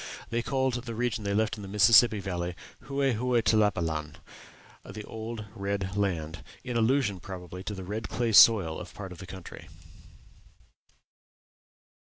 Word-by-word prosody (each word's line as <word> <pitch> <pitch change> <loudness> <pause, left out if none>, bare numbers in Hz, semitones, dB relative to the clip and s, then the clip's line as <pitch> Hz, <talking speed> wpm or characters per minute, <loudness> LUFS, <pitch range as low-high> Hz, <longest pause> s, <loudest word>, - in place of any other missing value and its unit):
They 120 0 0
called 130 +1 0
the 120 -1 -5
region 115 -2 -1
they 100 0 -1
left 110 +1 0
in - - -8
the 100 - -8
Mississippi 105 +2 +6
Valley 90 -2 -3 0.3
"Hue 140 0 -2
Hue 125 -2 +2
Tlapalan" 85 -9 +1 0.7
the 105 +2 -8
old, 110 +1 -6
old 105 - -10
red 100 -2 -3
land 85 -6 -2 0.2
in 125 - -5
allusion, 115 -4 +2
probably, 90 0 -8
to 105 - -4
the 95 - -7
red 105 +4 -5
clay 120 -1 -1
soil 100 -7 +6
of - - -10
part 95 -3 -7
of 90 - -10
the 95 - -9
country. 95 -2 -10
105 Hz, 155 wpm, -28 LUFS, 95-115 Hz, 0.7 s, Mississippi